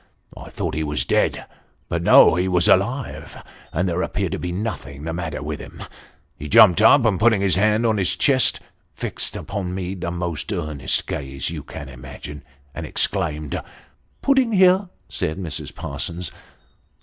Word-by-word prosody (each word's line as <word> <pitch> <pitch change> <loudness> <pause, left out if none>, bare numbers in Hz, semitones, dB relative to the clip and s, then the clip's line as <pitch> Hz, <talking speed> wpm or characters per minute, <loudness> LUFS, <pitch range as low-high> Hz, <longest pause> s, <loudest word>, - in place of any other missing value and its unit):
I - - -10
thought - - -4
he 80 +2 -2
was 75 0 -1
dead; - - 0 0.4
but - - -2
no, - - +7
he 90 +2 0
was 90 -2 +3
alive, 120 +7 0 0.3
and 90 +4 -1
there 90 0 -1
appeared 95 -1 -2
to - - -3
be 90 - -4
nothing 85 - -5
the 80 +1 -4
matter 80 -4 -4
with 75 0 -5
him. - - -10 0.6
He 75 - -7
jumped 105 -4 +7
up, 125 +3 +6
and 105 -5 +2
putting 110 -2 +4
his 100 -2 +2
hand 105 +3 +2
to 115 -2 +3
his 95 -4 +1
chest, 130 -3 +3
and - - -26 0.3
fixing - - -2
upon 95 -2 -4
me 95 0 -4
the 90 -2 -4
most 85 +1 -4
earnest 75 -7 -1
gaze 70 -1 -4
you - - -5
can 70 - -9
imagine, 70 +2 -9 0.3
exclaimed 75 -7 -1 0.3
" - - -40
Pudding 265 -4 +3
here," 185 0 +4 0.2
said 80 - -3
Mrs. 85 -5 -5
Parsons. 85 +4 -4
90 Hz, 170 wpm, -22 LUFS, 75-105 Hz, 0.6 s, no